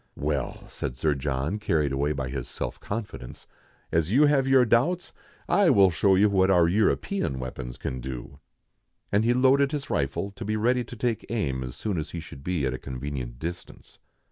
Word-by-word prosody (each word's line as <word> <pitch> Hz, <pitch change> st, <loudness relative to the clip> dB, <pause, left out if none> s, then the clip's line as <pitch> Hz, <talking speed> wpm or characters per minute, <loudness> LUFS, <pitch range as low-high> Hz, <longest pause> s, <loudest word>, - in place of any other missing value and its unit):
"Well," 70 Hz, -3 st, -3 dB
said 60 Hz, -, -5 dB
Sir 75 Hz, +3 st, +2 dB
John, 70 Hz, +7 st, -2 dB
carried 75 Hz, -8 st, +1 dB
away 70 Hz, +2 st, 0 dB
by 65 Hz, -3 st, -2 dB
his 65 Hz, -2 st, -4 dB
self -, -, -5 dB
confi 105 Hz, 0 st, -5 dB
dence, 60 Hz, -, -11 dB, 0.2 s
" -, -, -35 dB
as 80 Hz, +2 st, +1 dB
you 140 Hz, +6 st, +6 dB
have 140 Hz, -2 st, +3 dB
your 135 Hz, -2 st, +5 dB
doubts, 155 Hz, +11 st, +1 dB, 0.3 s
I 180 Hz, +1 st, +4 dB
will 95 Hz, -2 st, +6 dB
show 95 Hz, +3 st, +3 dB
you 100 Hz, +3 st, +5 dB
what 95 Hz, -2 st, +3 dB
our 90 Hz, -3 st, +5 dB
European 105 Hz, -, +1 dB
weapons 65 Hz, -1 st, -6 dB
can 65 Hz, -, -4 dB
do." 65 Hz, +2 st, -7 dB, 0.7 s
And 105 Hz, +2 st, +3 dB
he 120 Hz, +2 st, +3 dB
loaded 135 Hz, +2 st, +4 dB
his 145 Hz, -3 st, -4 dB
rifle, 85 Hz, +8 st, -1 dB
to 110 Hz, -, -8 dB
be 110 Hz, +1 st, -1 dB
ready 125 Hz, +3 st, +2 dB
to 120 Hz, -, -9 dB
take 115 Hz, -1 st, -2 dB
aim 70 Hz, -, -1 dB
as 65 Hz, -1 st, -6 dB
soon 100 Hz, -6 st, -2 dB
as 75 Hz, -, -4 dB
he 85 Hz, -, -5 dB
should 70 Hz, -4 st, -11 dB
be 85 Hz, -4 st, -1 dB
at 65 Hz, -, -1 dB
a 65 Hz, -, -5 dB
convenient 65 Hz, -2 st, -5 dB
distance. 85 Hz, +6 st, -8 dB
85 Hz, 200 wpm, -26 LUFS, -, 0.7 s, you